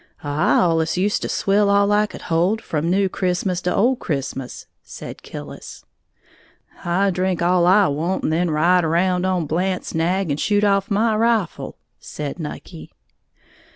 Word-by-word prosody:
"I 145 Hz, +3 st, +1 dB
allus 165 Hz, -1 st, +1 dB
used 200 Hz, +3 st, 0 dB
to -, -, -3 dB
swill 200 Hz, +1 st, +2 dB
all 200 Hz, 0 st, +3 dB
I 210 Hz, +1 st, +3 dB
could -, -, -11 dB
hold, 175 Hz, +6 st, +1 dB
from 160 Hz, -5 st, -2 dB
New 195 Hz, +2 st, +2 dB
Christmas 180 Hz, -1 st, -1 dB
to 180 Hz, -, -1 dB
Old 245 Hz, +4 st, +2 dB
Christmas," 135 Hz, -4 st, -4 dB, 0.2 s
said -, -, -10 dB
Killis. 70 Hz, -1 st, -10 dB, 1.0 s
"I 190 Hz, +3 st, +1 dB
drink 185 Hz, -1 st, -1 dB
all 175 Hz, 0 st, +3 dB
I 195 Hz, +2 st, +5 dB
want 160 Hz, +6 st, -2 dB
and 155 Hz, -, 0 dB
then 175 Hz, +2 st, +1 dB
ride 170 Hz, +4 st, +3 dB
around 180 Hz, +3 st, +1 dB
on 180 Hz, -3 st, 0 dB
Blant's 180 Hz, +5 st, -2 dB
nag 175 Hz, +1 st, 0 dB
and 145 Hz, -, -2 dB
shoot 205 Hz, -1 st, +1 dB
off 200 Hz, -1 st, +2 dB
my 220 Hz, +2 st, +1 dB
rifle," 225 Hz, -4 st, 0 dB, 0.2 s
said 150 Hz, +3 st, -6 dB
Nucky. 160 Hz, +1 st, -8 dB
180 Hz, 155 wpm, -21 LUFS, 165-200 Hz, 1.0 s, I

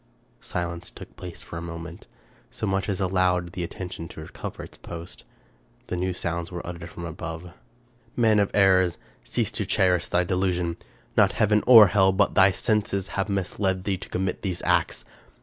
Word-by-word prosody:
Silence 85 Hz, -1 st, -4 dB
took -, -, -12 dB
place 90 Hz, -2 st, -8 dB
for 85 Hz, -, -8 dB
a -, -, -5 dB
moment: 85 Hz, +1 st, -8 dB, 0.4 s
so -, -, -4 dB
much 95 Hz, 0 st, -1 dB
as 95 Hz, -, -1 dB
allowed 90 Hz, -2 st, +1 dB
the 90 Hz, -, -4 dB
attention 85 Hz, -1 st, -6 dB
to 80 Hz, -, -11 dB
recover 80 Hz, -, -7 dB
its -, -, -12 dB
post. 85 Hz, +1 st, -9 dB, 0.6 s
Then 90 Hz, -, -3 dB
new 95 Hz, +1 st, 0 dB
sounds 85 Hz, -1 st, -3 dB
were 85 Hz, -1 st, -6 dB
uttered 85 Hz, -1 st, -7 dB
from 85 Hz, 0 st, -8 dB
above: 80 Hz, +1 st, -7 dB, 0.2 s
— 120 Hz, 0 st, -35 dB
" 115 Hz, -, -34 dB
Man 110 Hz, -3 st, +4 dB
of 100 Hz, -, +2 dB
errors! 95 Hz, -4 st, +4 dB, 0.3 s
cease -, -, -1 dB
to -, -, -2 dB
cherish 90 Hz, -2 st, +2 dB
thy 90 Hz, -, +2 dB
delusion; 90 Hz, -2 st, 0 dB, 0.4 s
not -, -, +4 dB
heaven 105 Hz, 0 st, +2 dB
or 115 Hz, -4 st, +11 dB
hell, 95 Hz, 0 st, +4 dB
but 100 Hz, +2 st, +2 dB
thy 95 Hz, 0 st, +6 dB
senses, 100 Hz, -1 st, 0 dB
have 100 Hz, +1 st, -2 dB
misled 95 Hz, -1 st, -1 dB
thee 95 Hz, -1 st, -1 dB
to -, -, -9 dB
commit 95 Hz, 0 st, -2 dB
these 90 Hz, -3 st, -3 dB
acts. -, -, +1 dB
90 Hz, 185 wpm, -25 LUFS, 85-95 Hz, 0.6 s, or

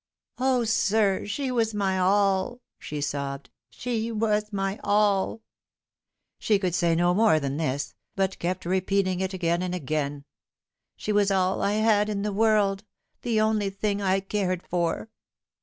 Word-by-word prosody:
" -, -, -67 dB
O, 255 Hz, -1 st, +2 dB
sir, 215 Hz, -3 st, +1 dB
she 260 Hz, +5 st, -2 dB
was 225 Hz, -3 st, 0 dB
my 190 Hz, -2 st, 0 dB
all 195 Hz, +4 st, +2 dB
!" -, -, -61 dB
she 150 Hz, -1 st, -5 dB
sobbed; 140 Hz, -1 st, -4 dB
" -, -, -66 dB
she 230 Hz, -2 st, -3 dB
was 215 Hz, -1 st, 0 dB
my 195 Hz, 0 st, -2 dB
all 205 Hz, +1 st, +1 dB, 0.5 s
!" -, -, -60 dB
She 210 Hz, -, +2 dB
could 185 Hz, -3 st, -1 dB
say 170 Hz, -1 st, +2 dB
no 175 Hz, +1 st, +3 dB
more 210 Hz, -5 st, +4 dB
than 140 Hz, -1 st, -3 dB
this, 145 Hz, -3 st, -2 dB, 0.2 s
but 195 Hz, -1 st, -1 dB
kept 180 Hz, +1 st, -2 dB
repeating 185 Hz, 0 st, 0 dB
it 190 Hz, 0 st, -1 dB
again 170 Hz, -1 st, 0 dB
and 180 Hz, 0 st, -2 dB
again. 145 Hz, -3 st, -3 dB, 0.3 s
" -, -, -62 dB
She 215 Hz, -, -3 dB
was 205 Hz, -1 st, +3 dB
all 190 Hz, -1 st, +1 dB
I 200 Hz, -, +1 dB
had 215 Hz, -1 st, +3 dB
in 200 Hz, -1 st, -2 dB
the 210 Hz, -1 st, -2 dB
world; 205 Hz, -2 st, +2 dB, 0.4 s
the 230 Hz, -3 st, 0 dB
only 215 Hz, -2 st, +1 dB
thing 200 Hz, +1 st, -2 dB
I 195 Hz, 0 st, +1 dB
cared 190 Hz, -2 st, -2 dB
for." 175 Hz, +5 st, -1 dB
195 Hz, 175 wpm, -26 LUFS, 180-215 Hz, 0.5 s, more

